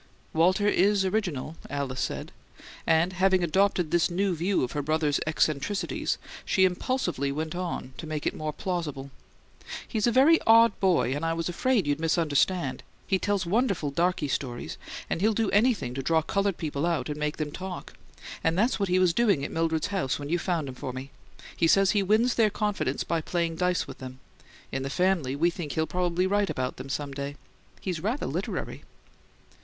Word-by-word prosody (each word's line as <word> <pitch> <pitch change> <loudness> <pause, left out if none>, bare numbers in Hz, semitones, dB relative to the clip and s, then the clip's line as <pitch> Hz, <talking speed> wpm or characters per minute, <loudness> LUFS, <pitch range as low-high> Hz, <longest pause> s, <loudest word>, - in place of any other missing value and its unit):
"Walter 185 +5 +3
IS 200 0 +3
original," 175 -7 -2
Alice 140 -3 -3
said; - - -3 0.6
and, 165 +3 +3
having 185 0 +3
adopted 180 -1 +2
this 175 +1 +3
new 185 +1 0
view 180 +2 +1
of 125 - -2
her 145 - -2
brother's 150 0 +1
eccentricities, 155 +5 0 0.3
she 190 -3 +3
impulsively 180 - -1
went 155 +2 -3
on 175 -7 -4
to 160 - -6
make 155 -1 -4
it - - +1
more 155 0 -3
plausible. 150 -7 -4 0.8
"He's 220 0 0
a - - +4
very 285 +7 +6
odd 230 0 +7
boy, 150 -10 +2
and 145 +3 -3
I 165 0 +1
was 165 +1 -2
afraid 240 +3 +1
you'd 145 +1 0
misunderstand. 160 -2 +1 0.2
He 190 - +1
tells 205 -2 0
wonderful 195 - +1
'darky 170 0 +1
stories,' 120 - -3 0.3
and 165 - -2
he'll 215 +1 +3
do 225 -2 +1
anything 205 - +2
to 135 - -3
draw 160 +3 +2
coloured 200 +2 0
people 150 0 -2
out 160 -7 0
and 150 0 -4
make 150 0 -2
them 150 -2 -3
talk; 185 +2 -7 0.5
and 165 +1 +1
that's 225 +5 +2
what 200 -2 0
he 180 - +3
was 185 -2 +4
doing 200 -12 +2
at - - -5
Mildred's 165 0 0
when 145 0 -6
you 175 +2 +1
found 170 -5 -1
him 130 - -6
for 130 0 -5
me 130 +2 -7 0.4
he 165 - +2
says 195 +3 +5
he 205 - +2
wins 220 +5 +3
their 220 -2 +3
confidence 205 -10 -1
by 165 -1 -1
playing 170 0 -1
dice 180 +1 +1
with - - -10
them. 130 0 -8 0.5
In 135 - -2
the 135 - -3
family 175 -5 +1
we 170 +4 +2
think 165 -6 -5
he'll 160 +3 +1
probably 180 +1 0
write 205 +1 +1
about 130 0 -2
them 130 +2 -8
some 140 +1 -3
day. 140 +1 -5 0.5
He's 180 -4 -3
rather 225 - -2
literary." - - -4
170 Hz, 190 wpm, -27 LUFS, 145-195 Hz, 0.8 s, odd